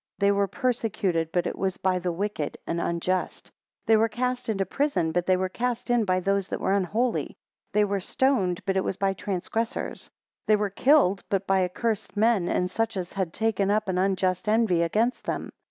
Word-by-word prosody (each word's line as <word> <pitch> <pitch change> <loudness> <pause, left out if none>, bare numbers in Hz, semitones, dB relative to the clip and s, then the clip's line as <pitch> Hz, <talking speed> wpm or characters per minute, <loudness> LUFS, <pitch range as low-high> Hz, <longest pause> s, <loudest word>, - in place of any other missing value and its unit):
4 200 - +2
They 200 - +5
were 200 0 +2
persecuted, 190 -6 -1
but 175 0 0
it - - -2
was 190 -1 -2
by 185 -1 +1
the 180 0 -2
wicked 180 -4 -3
and 170 0 -2
unjust. 175 +2 -2
5 - - -38 0.3
They 225 - +5
were 225 +1 +3
cast 250 +2 -2
into 195 -3 0
prison, 275 - 0
but 175 +1 -1
they 185 -1 +4
were 185 0 0
cast 245 +4 -2
in 240 -2 +3
by 185 -1 +1
those 195 0 0
that - - -4
were 190 - +1
unholy. 215 +6 +1
6 - - -18 0.4
They 210 0 +4
were 200 -1 -1
stoned, 190 -4 0
but 195 - 0
it 190 - +2
was 190 - -2
by 195 -1 +1
transgressors. 200 +4 -3
7 - - -21 0.4
They 215 - +6
were 205 -1 -1
killed, 200 -5 +3
but 195 -1 0
by 190 -1 +3
accursed 210 +3 -2
men, 215 -4 +3
and 180 0 0
such 225 0 -1
as 180 -1 -4
had 190 -4 -2
taken 210 -2 0
up 215 0 +1
an 180 -1 0
unjust 190 +1 0
envy 215 -6 +3
against 220 +9 0
them. - - -3
195 Hz, 215 wpm, -26 LUFS, 185-225 Hz, 0.4 s, They